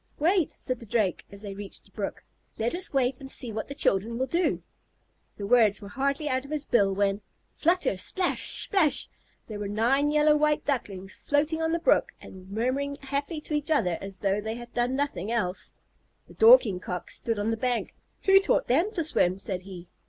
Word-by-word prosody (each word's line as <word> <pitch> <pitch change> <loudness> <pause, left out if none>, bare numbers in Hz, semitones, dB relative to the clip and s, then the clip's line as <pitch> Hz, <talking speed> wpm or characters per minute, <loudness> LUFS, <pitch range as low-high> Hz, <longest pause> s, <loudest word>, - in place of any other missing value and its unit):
"Wait," 345 +2 +2
said 255 -2 -3
the 230 - -9
Drake, 200 -4 0
as 200 +1 -11
they 200 -1 -6
reached 200 0 -8
the - - -23
brook. - - -5 0.3
"Let 230 +5 -1
us 360 +1 -1
wait 260 -2 +1
and 270 -1 -9
see 245 -3 -1
what 220 0 -4
the 280 - -7
children 230 -4 +1
will 260 - 0
do." 340 +5 0 0.7
The 200 - -5
words 215 -2 +4
were 200 - -10
hardly 275 +6 -1
out 260 -2 0
of 280 - -12
his 300 -1 -3
bill 200 -5 +3
when 200 +1 +1 0.3
flutter 345 - +2
splash 365 - -1
splash! 360 -8 +1 0.4
there 215 -2 -7
were 205 - -3
nine 240 +8 +2
yellow 300 0 +4
white 300 0 +1
Ducklings 195 -9 -3
floating 305 +3 0
on 320 0 0
the 335 - +2
brook - - +2
and 185 0 -12
murmuring 255 +7 -1
happily 280 +3 -3
to 305 - -6
each 295 0 -1
other 180 - +1
as 195 0 -8
though 200 +1 0
they 220 +1 -4
had 240 0 -10
never 240 0 +2
done 265 - -2
anything 230 -8 -2
else. 200 -6 -2 0.6
The - - -15
Dorking 445 - +6
Cock 180 -1 -5
stood 230 -2 -2
on 205 +2 0
the - - 0
bank. 245 +1 -2 0.3
"Who 390 0 +7
taught 395 - +1
them 330 - +2
to 335 - +1
swim?" 185 - +2
said 190 -2 -4
he. 180 -2 -10
245 Hz, 205 wpm, -27 LUFS, 205-295 Hz, 0.7 s, Who